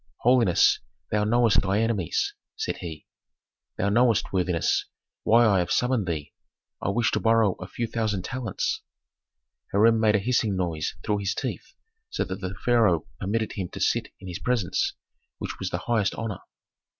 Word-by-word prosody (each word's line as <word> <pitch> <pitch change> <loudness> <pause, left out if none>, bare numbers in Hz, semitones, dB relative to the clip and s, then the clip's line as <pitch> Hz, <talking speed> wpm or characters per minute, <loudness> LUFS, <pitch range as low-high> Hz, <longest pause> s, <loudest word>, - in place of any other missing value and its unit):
"Holiness, 120 -7 +4 0.3
thou 105 0 +2
knowest 115 0 +4
thy 95 +2 +1
enemies," 110 -7 0 0.2
said - - -3
he. 80 -4 -8 0.7
"Thou 100 - +1
knowest, 115 -1 +2
worthiness, 90 -3 +1 0.3
why 120 +2 +5
I 100 -4 +4
have 90 - -1
summoned 125 -5 +1
thee. 75 -4 -4 0.5
I - - -1
wish 115 +3 +1
to - - +1
borrow 115 -2 +4
a 90 - -7
few 120 - -3
thousand 110 -4 -1
talents." 120 0 -2 0.9
Hiram 110 +3 +4
made 110 -1 +4
a - - +5
hissing 110 -1 +1
noise 85 -4 -2
through 105 -1 0
his 100 -1 -1
teeth, - - -5 0.4
so - - -1
that 95 +1 -6
the 95 0 -4
pharaoh 110 -10 +3
permitted 110 +3 -1
him 95 -4 -4
to - - -6
sit - - +1
in 95 - -10
his 90 -2 -5
presence, 120 -8 0 0.4
which - - -6
was - - -2
the - - -2
highest 110 -5 +1
honor. 115 -4 -4
105 Hz, 165 wpm, -26 LUFS, 95-115 Hz, 0.9 s, why